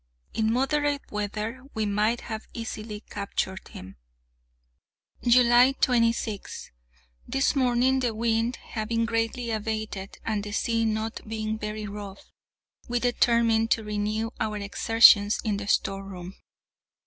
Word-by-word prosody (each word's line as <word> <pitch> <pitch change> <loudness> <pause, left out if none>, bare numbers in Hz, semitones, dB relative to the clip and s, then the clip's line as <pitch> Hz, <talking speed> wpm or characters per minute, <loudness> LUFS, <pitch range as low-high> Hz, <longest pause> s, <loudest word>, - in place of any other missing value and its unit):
In 220 0 +1
moderate 285 +3 0
weather 210 +4 -3
we 220 -1 0
might 210 +3 +1
have 220 -1 -6
easily 215 -2 -6
captured 200 -2 -4
him. 95 -2 -11 1.2
July 245 +1 +6
26. 230 -5 0 0.6
This 270 +2 +1
morning, 255 0 +3
the 240 -4 -1
wind 230 +2 0
having 230 +1 -2
greatly 230 +1 -1
abated, 215 -3 -4
and 215 -2 -1
the 205 0 -6
sea 230 0 +1
not 220 0 -2
being 220 0 -3
very 210 0 -4
rough, 200 -1 -9 0.6
we 245 0 0
determined 235 -2 +2
to 225 - +2
renew 210 +1 -2
our 215 -1 -1
exertions 205 +1 +5
in 210 -3 0
the 200 0 -6
storeroom. 195 -3 -2
220 Hz, 120 wpm, -26 LUFS, 210-235 Hz, 1.2 s, July